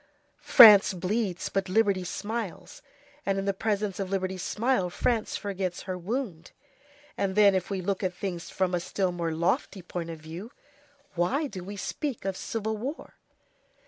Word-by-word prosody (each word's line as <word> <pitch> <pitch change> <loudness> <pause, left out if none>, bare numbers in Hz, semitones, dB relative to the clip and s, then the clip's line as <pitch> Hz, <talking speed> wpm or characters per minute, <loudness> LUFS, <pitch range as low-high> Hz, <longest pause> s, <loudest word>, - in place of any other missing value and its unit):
France 205 -4 +9
bleeds, 185 +1 -2
but 195 -1 -1
liberty 200 -2 +2
smiles; 215 - -5 0.4
and 195 0 0
in 195 - -2
the 200 - +1
presence 205 -1 -1
of 195 -1 -2
liberty's 190 -1 -2
smile, 220 -4 0
France 225 +5 -1
forgets 190 -3 -4
her 185 -1 -4
wound. 180 -2 -4 0.7
And 190 -1 0
then 205 -2 +6
if 185 -2 -1
we 195 -2 -2
look 195 +1 -2
at 185 -2 -2
things 180 -2 -5
from 185 -1 -1
a 175 - +2
still 185 +2 -1
more 170 -2 -2
lofty 170 +3 -1
point 170 -1 -5
of 165 - -6
view, 165 +8 -8 0.6
why 180 - +1
do 195 -10 -7
we 200 +2 -7
speak 265 +3 -4
of 195 -1 -1
civil 220 +2 -3
war? 270 +8 -6
195 Hz, 165 wpm, -28 LUFS, 180-210 Hz, 0.7 s, France